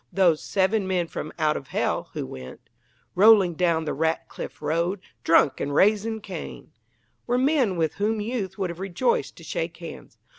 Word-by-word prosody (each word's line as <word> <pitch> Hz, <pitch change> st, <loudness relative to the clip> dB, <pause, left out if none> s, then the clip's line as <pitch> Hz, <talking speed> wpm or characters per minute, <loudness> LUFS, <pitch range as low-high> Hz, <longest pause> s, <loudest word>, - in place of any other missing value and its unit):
Those 175 Hz, -5 st, +3 dB
"seven 195 Hz, +1 st, +1 dB
men 180 Hz, -2 st, +1 dB
from 155 Hz, -1 st, -6 dB
out 155 Hz, -1 st, +2 dB
of 135 Hz, -, -6 dB
Hell" -, -, -1 dB
who -, -, -3 dB
went 65 Hz, -1 st, -10 dB, 0.4 s
Rolling 200 Hz, -3 st, +6 dB
down 165 Hz, -1 st, +1 dB
the 150 Hz, -, -2 dB
Ratcliff 160 Hz, +2 st, -3 dB
Road, 170 Hz, +6 st, 0 dB, 0.2 s
Drunk, 160 Hz, -3 st, +4 dB
and 140 Hz, 0 st, -2 dB
raising 215 Hz, +4 st, +3 dB
Cain, -, -, -8 dB, 0.6 s
were 245 Hz, 0 st, +2 dB
men 260 Hz, -, +2 dB
with 160 Hz, -2 st, 0 dB
whom 215 Hz, +1 st, +1 dB
youth 210 Hz, -4 st, -3 dB
would 190 Hz, -3 st, -1 dB
have 170 Hz, -, -10 dB
rejoiced 195 Hz, -, 0 dB
to -, -, -14 dB
shake -, -, -4 dB
hands. -, -, -10 dB
185 Hz, 170 wpm, -25 LUFS, 160-215 Hz, 0.6 s, Rolling